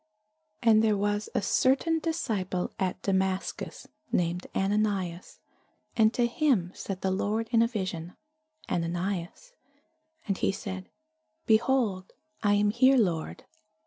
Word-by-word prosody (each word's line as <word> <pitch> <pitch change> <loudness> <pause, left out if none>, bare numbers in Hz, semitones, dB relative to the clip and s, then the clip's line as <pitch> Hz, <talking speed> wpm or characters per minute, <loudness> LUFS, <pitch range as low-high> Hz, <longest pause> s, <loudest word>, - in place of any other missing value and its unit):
And 220 -1 +5
there 215 -2 +3
was 205 +1 -1
a - - +1
certain 275 - +2
disciple 210 - -2
at 185 -2 -1
Damascus, 190 -1 -2 0.2
named 175 +1 0
Ananias; 195 -3 -1 0.6
and 220 -1 +5
to 240 - +3
him 235 - +1
said 190 -2 -6
the 190 - 0
Lord 215 +4 -1
in 230 -2 +5
a 230 - +4
vision, 185 -7 -4 0.5
Ananias. 175 - -3 0.7
And 195 -2 -1
he - - +2
said, 190 -1 -6 0.6
Behold, 220 -4 +2 0.3
I 205 -1 +3
am 205 0 +3
here, 260 +4 +5
Lord. 175 -9 -1
205 Hz, 120 wpm, -28 LUFS, 185-225 Hz, 0.7 s, And